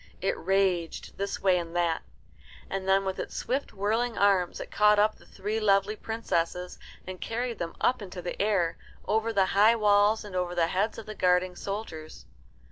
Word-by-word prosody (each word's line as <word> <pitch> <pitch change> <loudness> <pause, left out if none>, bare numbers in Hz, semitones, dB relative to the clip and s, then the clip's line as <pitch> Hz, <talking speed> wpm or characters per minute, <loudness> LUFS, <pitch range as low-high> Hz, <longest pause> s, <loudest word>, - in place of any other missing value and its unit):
It - - 0
raged 185 -3 -1
this 200 0 -3
way 185 -2 +4
and 170 0 -7
that, 170 -2 +1 0.7
and 190 0 -3
then 195 0 +3
with 190 0 -3
its - - -5
swift 270 +3 -2
whirling 220 +4 -1
arms 195 -3 +2
it - - -7
caught 210 0 +4
up 210 +1 +4
the - - -19
three 210 +3 -3
lovely 200 0 +2
princesses, 180 -6 -2 0.3
and 185 0 -8
carried 235 -1 -3
them 165 -1 -4
up 250 -2 +2
into 185 -2 -7
the 180 - -4
air, 195 -5 +1 0.3
over 220 +1 +1
the 195 -3 +3
high 210 +4 +5
walls 210 0 +3
and 200 -3 -8
over 180 -1 -1
the 170 -1 +3
heads 200 +5 0
of 225 - -8
the 215 - -6
guarding 180 -2 +2
soldiers. 175 -7 -6
195 Hz, 185 wpm, -28 LUFS, 180-215 Hz, 0.7 s, high